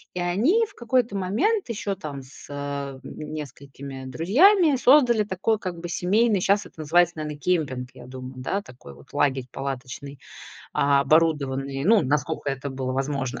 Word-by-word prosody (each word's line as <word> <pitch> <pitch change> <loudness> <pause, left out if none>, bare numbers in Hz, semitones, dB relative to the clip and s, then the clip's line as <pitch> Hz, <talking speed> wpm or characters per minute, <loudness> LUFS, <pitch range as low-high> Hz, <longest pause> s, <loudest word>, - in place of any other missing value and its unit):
И - - -2
они 225 - +2
в - - -19
какой-то 235 -2 0
момент 250 - 0
ещё 205 -3 -2
там 145 -7 -7
с, 130 - -14
э, - - -7
м, 140 -1 -5
несколькими 140 -2 -8
друзьями 285 - +4
создали 245 -4 +5
такой 205 +2 -1
как 185 -4 -5
бы 175 - -5
семейный, 200 +4 +2
щас 200 +2 +2
это - - -16
называется, 170 +2 +3
наверно, 150 -1 -5
кемпинг, 140 -6 -1
я - - -12
думаю. 130 0 -8
Да, 135 +10 -2
такой 120 - -13
вот - - -18
лагерь 135 -3 +1
палаточный, 135 +1 -6 0.5
а, 140 0 +3
оборудованный, 140 -3 +1
ну, 215 +2 +5
насколько 150 +2 -1
это 135 +1 -4
было 130 -1 -3
возможно 135 -1 -2
150 Hz, 160 wpm, -24 LUFS, 135-200 Hz, 0.5 s, создали